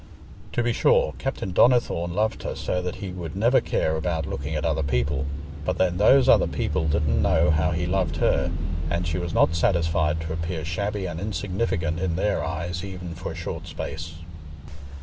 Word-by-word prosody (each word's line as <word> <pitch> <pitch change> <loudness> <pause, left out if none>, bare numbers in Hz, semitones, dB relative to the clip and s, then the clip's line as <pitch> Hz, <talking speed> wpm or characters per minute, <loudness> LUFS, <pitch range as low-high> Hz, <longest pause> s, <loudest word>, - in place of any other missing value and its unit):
To 120 - +1
be 120 0 +1
sure, - - +3
Captain 95 - -3
Donnithorne 90 -8 +3
loved 110 +2 0
her - - -4
so 90 - -2
that 90 -1 -4
he 95 -2 -6
would 85 -2 -6
never 120 +6 +4
care 80 - 0
about 80 -1 -1
looking 70 +4 -4
at 75 +1 -1
other 80 -1 +1
people, 70 0 0 0.4
but 90 +4 -1
then 90 -1 +2
those 130 +7 +5
other - - +6
people 80 +1 -1
didn't 75 -1 +2
know 75 - +3
how 80 +1 +2
he 85 +1 -1
loved 90 -3 0
her, 85 - +2 0.4
and 85 0 -1
she 80 +2 -1
was 85 -1 -3
not 80 - +3
satisfied 80 -2 +1
to 80 0 -4
appear 80 -1 -3
shabby 100 +4 -2
and 85 -2 -4
insignificant 95 -4 -2
in 90 -2 -1
their 100 +3 0
eyes 85 +3 -3
even 90 -3 -6
for - - -6
a - - -9
short - - -5
space. 80 0 -6
85 Hz, 190 wpm, -25 LUFS, 80-95 Hz, 0.4 s, other